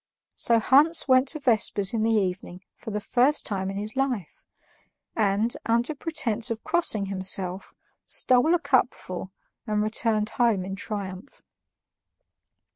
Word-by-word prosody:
So 235 Hz, -, +2 dB
Hans 290 Hz, +9 st, +3 dB
went 260 Hz, 0 st, +4 dB
to 310 Hz, -, -3 dB
vespers 215 Hz, -6 st, +3 dB
in 225 Hz, -, -1 dB
the 225 Hz, -, +1 dB
evening 185 Hz, -2 st, -3 dB
for 225 Hz, -, -10 dB
the 210 Hz, -1 st, -3 dB
first 255 Hz, +7 st, +1 dB
time 190 Hz, -2 st, -3 dB
in 195 Hz, -, -5 dB
his 210 Hz, +3 st, -5 dB
life 255 Hz, -, -3 dB, 0.7 s
and, 215 Hz, +2 st, +1 dB
under 235 Hz, +6 st, +1 dB
pretense 265 Hz, -7 st, -1 dB
of 225 Hz, -1 st, -5 dB
crossing 315 Hz, -, +1 dB
himself, 190 Hz, -1 st, -2 dB, 0.3 s
stole 255 Hz, +7 st, +3 dB
a -, -, 0 dB
cupful 255 Hz, -, -1 dB, 0.4 s
and 210 Hz, -1 st, 0 dB
returned 215 Hz, 0 st, 0 dB
home 225 Hz, -6 st, 0 dB
in 195 Hz, 0 st, -5 dB
triumph. 195 Hz, +2 st, -7 dB
220 Hz, 135 wpm, -25 LUFS, 195-255 Hz, 0.7 s, went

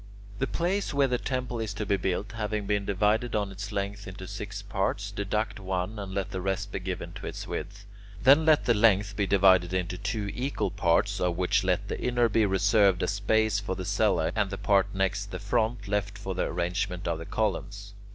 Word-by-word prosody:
The 135 Hz, -, 0 dB
place 175 Hz, 0 st, -1 dB
where 140 Hz, -1 st, +4 dB
the 125 Hz, -1 st, 0 dB
temple 125 Hz, -2 st, -3 dB
is 110 Hz, -2 st, -3 dB
to 105 Hz, -, -3 dB
be 100 Hz, -, +2 dB
built 95 Hz, +2 st, -2 dB
having 105 Hz, -1 st, -3 dB
been 100 Hz, 0 st, 0 dB
divided 105 Hz, +5 st, +1 dB
on 100 Hz, -2 st, 0 dB
its 100 Hz, +2 st, -6 dB
length 100 Hz, 0 st, -3 dB
into 95 Hz, 0 st, -8 dB
six 100 Hz, +1 st, -6 dB
parts, 100 Hz, 0 st, -2 dB
deduct 105 Hz, +1 st, -2 dB
one 95 Hz, +2 st, -3 dB
and 100 Hz, -2 st, -6 dB
let 95 Hz, 0 st, -3 dB
the 95 Hz, -, -3 dB
rest 95 Hz, 0 st, -2 dB
be -, -, -3 dB
given -, -, -5 dB
to -, -, -7 dB
its -, -, -6 dB
width. 100 Hz, +3 st, -6 dB, 0.4 s
Then 140 Hz, +5 st, +7 dB
let 155 Hz, -1 st, +4 dB
the 120 Hz, -, +4 dB
length 105 Hz, -2 st, +3 dB
be 100 Hz, -1 st, 0 dB
divided 95 Hz, -2 st, +4 dB
into 90 Hz, 0 st, -2 dB
two 105 Hz, 0 st, -2 dB
equal 135 Hz, +3 st, -2 dB
parts, 100 Hz, +2 st, +1 dB
of 90 Hz, -1 st, 0 dB
which 100 Hz, +3 st, +2 dB
let 95 Hz, +2 st, 0 dB
the -, -, -4 dB
inner 120 Hz, -1 st, +2 dB
be 110 Hz, 0 st, +3 dB
reserved 100 Hz, 0 st, +3 dB
as -, -, +1 dB
space 105 Hz, +1 st, +2 dB
for 100 Hz, -1 st, -3 dB
the 95 Hz, -, -5 dB
cellae, 100 Hz, -5 st, +2 dB
and 105 Hz, -3 st, +1 dB
the 100 Hz, -, -4 dB
part 100 Hz, -1 st, +3 dB
next 95 Hz, +1 st, 0 dB
the -, -, -5 dB
front 105 Hz, +1 st, -1 dB
left 105 Hz, 0 st, -1 dB
for 95 Hz, -1 st, -4 dB
the 90 Hz, -, -1 dB
arrangement 90 Hz, +2 st, -2 dB
of 85 Hz, -1 st, -1 dB
the 80 Hz, -, -7 dB
columns. 100 Hz, -1 st, -2 dB
100 Hz, 210 wpm, -28 LUFS, 95-110 Hz, 0.4 s, Then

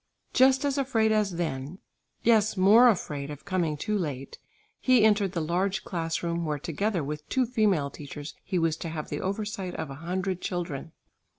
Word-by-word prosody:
Just 265 Hz, +2 st, +5 dB
as 280 Hz, 0 st, 0 dB
afraid 225 Hz, -5 st, +2 dB
as 210 Hz, -4 st, +1 dB
then, 155 Hz, -1 st, -3 dB, 0.5 s
yes, 220 Hz, -3 st, +3 dB
more 215 Hz, +7 st, +7 dB
afraid 145 Hz, -9 st, -2 dB
of 145 Hz, -1 st, -9 dB
coming 175 Hz, -6 st, 0 dB
too 210 Hz, +8 st, -2 dB
late 145 Hz, -8 st, -4 dB, 0.4 s
he 255 Hz, -4 st, +4 dB
entered 205 Hz, -3 st, +3 dB
the 170 Hz, -, -1 dB
large 185 Hz, +5 st, 0 dB
class 165 Hz, -2 st, -3 dB
room, 170 Hz, 0 st, -1 dB
where 150 Hz, -2 st, -1 dB
together 175 Hz, +4 st, -1 dB
with 150 Hz, +1 st, -6 dB
two 260 Hz, -1 st, +2 dB
female 205 Hz, -, +1 dB
teachers 145 Hz, 0 st, -8 dB
he 185 Hz, -, -2 dB
was 165 Hz, -2 st, +2 dB
to 165 Hz, -, -5 dB
have 155 Hz, -1 st, -5 dB
the 145 Hz, -, -3 dB
oversight 195 Hz, -2 st, -3 dB
of 145 Hz, -, -4 dB
a 135 Hz, +3 st, -9 dB
hundred 185 Hz, +1 st, -2 dB
children. 170 Hz, -4 st, -4 dB
180 Hz, 180 wpm, -27 LUFS, 155-215 Hz, 0.5 s, more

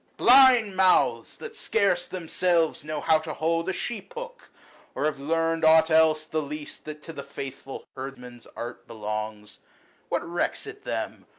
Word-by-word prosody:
Blind 250 Hz, -5 st, +6 dB
mouths! 185 Hz, -1 st, +3 dB
that 460 Hz, -1 st, -8 dB
scarce 195 Hz, -5 st, +1 dB
themselves 170 Hz, -3 st, 0 dB
know 150 Hz, 0 st, -4 dB
how 160 Hz, -1 st, +3 dB
to 155 Hz, 0 st, -6 dB
hold 165 Hz, +2 st, 0 dB
A -, -, 0 dB
sheep 240 Hz, -, -6 dB
hook, -, -, -8 dB, 0.5 s
or -, -, -1 dB
have 155 Hz, -2 st, -1 dB
learnt 165 Hz, +2 st, 0 dB
aught 160 Hz, +1 st, +6 dB
else 160 Hz, -1 st, +4 dB
the 155 Hz, 0 st, -2 dB
least 150 Hz, +1 st, -8 dB
120 155 Hz, -, -5 dB
That -, -, -16 dB
to 165 Hz, -, -8 dB
the 140 Hz, -, -6 dB
faithful 135 Hz, -1 st, -8 dB
herdman's 125 Hz, -3 st, -9 dB
art 120 Hz, +1 st, -7 dB
belongs! 105 Hz, -1 st, -6 dB, 0.5 s
What -, -, -2 dB
recks 175 Hz, -, -2 dB
it 425 Hz, -1 st, -10 dB
them -, -, -4 dB
160 Hz, 165 wpm, -26 LUFS, 140-185 Hz, 0.5 s, Blind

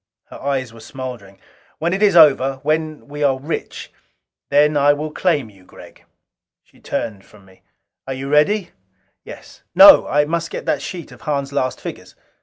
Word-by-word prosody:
Her -, -, -11 dB
eyes 130 Hz, -3 st, -3 dB
were 115 Hz, -, -14 dB
smoldering. 110 Hz, -4 st, -9 dB, 0.4 s
"When 170 Hz, +3 st, -1 dB
it 195 Hz, -, -2 dB
is 205 Hz, -4 st, +3 dB
over 135 Hz, -4 st, +5 dB
when 155 Hz, -1 st, -2 dB
we 145 Hz, +1 st, -8 dB
are 135 Hz, -2 st, +2 dB
rich 145 Hz, +5 st, -6 dB, 0.6 s
then 150 Hz, +1 st, +3 dB
I 145 Hz, 0 st, +4 dB
will 150 Hz, +1 st, -5 dB
claim 150 Hz, -, -1 dB
you, 95 Hz, -2 st, -21 dB
Gregg." -, -, -16 dB, 0.6 s
She -, -, -26 dB
turned 100 Hz, -3 st, -5 dB
from 100 Hz, -1 st, -20 dB
me. 95 Hz, -1 st, -22 dB, 0.5 s
"Are 135 Hz, -, -3 dB
you 135 Hz, +1 st, -6 dB
ready?" 150 Hz, +8 st, +1 dB, 0.5 s
"Yes. -, -, -13 dB
No! -, -, +8 dB
I 145 Hz, 0 st, +2 dB
must 170 Hz, +2 st, -3 dB
get -, -, -7 dB
that 140 Hz, -, -1 dB
sheet 170 Hz, -1 st, -8 dB
of 125 Hz, -2 st, -15 dB
Hahn's 140 Hz, -1 st, -3 dB
last 130 Hz, -2 st, -2 dB
figures." -, -, -9 dB
145 Hz, 175 wpm, -19 LUFS, 130-155 Hz, 0.6 s, No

